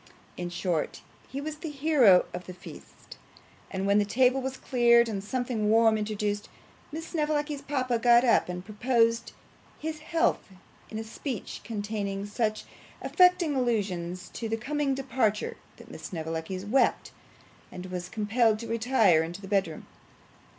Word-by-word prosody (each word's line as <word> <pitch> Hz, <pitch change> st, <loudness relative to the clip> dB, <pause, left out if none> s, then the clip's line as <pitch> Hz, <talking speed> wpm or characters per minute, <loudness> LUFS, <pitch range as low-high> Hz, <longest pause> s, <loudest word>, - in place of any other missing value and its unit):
In 175 Hz, 0 st, -4 dB
short, 175 Hz, -2 st, -2 dB, 0.2 s
he 270 Hz, -, -5 dB
was 305 Hz, +1 st, -5 dB
the 320 Hz, +1 st, -6 dB
hero 275 Hz, -, +5 dB
of 180 Hz, 0 st, -7 dB
the 185 Hz, -, -8 dB
feast; 175 Hz, -4 st, -13 dB, 0.5 s
and 190 Hz, +1 st, -3 dB
when 200 Hz, +1 st, +4 dB
the -, -, +3 dB
table 255 Hz, +5 st, +2 dB
was 265 Hz, 0 st, -4 dB
cleared 235 Hz, -2 st, +4 dB
and 200 Hz, -3 st, -4 dB
something 240 Hz, -2 st, -1 dB
warm 225 Hz, 0 st, +5 dB
introduced, 210 Hz, -1 st, -2 dB, 0.4 s
Miss 320 Hz, +2 st, -6 dB
Snevellicci's 300 Hz, -2 st, -1 dB
papa 255 Hz, -4 st, -1 dB
got 240 Hz, +1 st, +6 dB
up 240 Hz, -6 st, +3 dB
and 180 Hz, +1 st, -5 dB
proposed 230 Hz, +1 st, +1 dB, 0.4 s
his 315 Hz, 0 st, -5 dB
health 325 Hz, +2 st, +1 dB, 0.5 s
in 220 Hz, -, -6 dB
a 220 Hz, -, -3 dB
speech 225 Hz, +1 st, -6 dB
containing 205 Hz, -2 st, -3 dB
such 215 Hz, +1 st, -1 dB, 0.4 s
affecting 360 Hz, -5 st, +3 dB
allusions 190 Hz, -8 st, -1 dB
to 230 Hz, -, -4 dB
his 225 Hz, 0 st, -1 dB
coming 280 Hz, +2 st, -1 dB
departure, 240 Hz, -5 st, -1 dB, 0.2 s
that -, -, -14 dB
Miss -, -, -9 dB
Snevellicci 165 Hz, +2 st, -4 dB
wept, 255 Hz, +6 st, +1 dB, 0.6 s
and 180 Hz, -, -8 dB
was 180 Hz, 0 st, -5 dB
compelled 220 Hz, +2 st, +2 dB
to 230 Hz, +1 st, -7 dB
retire 225 Hz, -7 st, +3 dB
into 170 Hz, +3 st, -5 dB
the 195 Hz, -, -10 dB
bedroom. 190 Hz, -5 st, -1 dB
225 Hz, 150 wpm, -28 LUFS, 195-265 Hz, 0.6 s, got